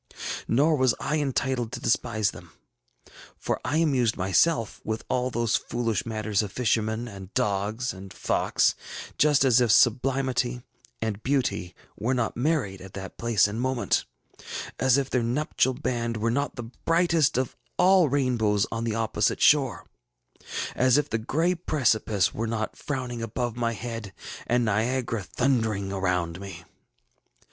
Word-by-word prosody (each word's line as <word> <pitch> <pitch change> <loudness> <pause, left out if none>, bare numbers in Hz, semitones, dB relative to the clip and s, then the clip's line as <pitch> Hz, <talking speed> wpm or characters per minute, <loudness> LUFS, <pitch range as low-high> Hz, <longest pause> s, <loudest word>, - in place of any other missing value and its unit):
Nor 150 +6 +3
was 130 -2 +3
I 155 +1 -1
entitled 130 -4 -1
to 125 - -4
despise 110 -3 +1
them; - - -13 0.8
for - - -2
I 145 - 0
amused 135 -8 +2
myself 110 - +1
with 110 0 -3
all 125 0 0
those 120 -2 0
foolish 115 -2 -1
matters 110 -2 0
of 105 -3 -5
fishermen, 110 0 0
and 100 -3 -10
dogs, 105 +4 0
and 95 0 -10
fox, - - +1 0.5
just 145 -2 +4
as 125 -1 +5
if 120 -3 +3
Sublimity 125 0 +2 0.4
and 110 -2 -3
Beauty 120 -10 -1 0.2
were 125 +4 -1
not 120 -2 -1
married 120 - 0
at 95 0 -11
that 95 -1 -8
place 115 -5 +3
and 110 +3 -4
moment; 130 -1 0 0.7
as 130 0 +4
if 135 -1 -1
their 125 - +2
nuptial 130 +1 0
band 120 -4 -2
were 115 +2 0
not 140 +1 -1
the 120 - -5
brightest 165 +5 +1
of 130 -1 -1 0.2
all 180 -3 +5
rainbows 120 -7 +1
on 115 0 -2
the 110 -2 -1
opposite 110 -2 0
shore; 135 -8 +3 0.9
as 130 +1 +4
if 150 0 0
the 110 - 0
gray 160 +10 +1
precipice 115 - +1
were 115 +1 -2
not 110 -1 -3
frowning 125 -4 -4
above 115 +1 -3
my 115 -1 -1
head 115 -3 -6 0.3
and 120 0 +2
Niagara 115 +2 0
thundering 110 -3 0
around 90 -3 -1
me. 95 -3 -8
120 Hz, 150 wpm, -26 LUFS, 110-130 Hz, 0.9 s, as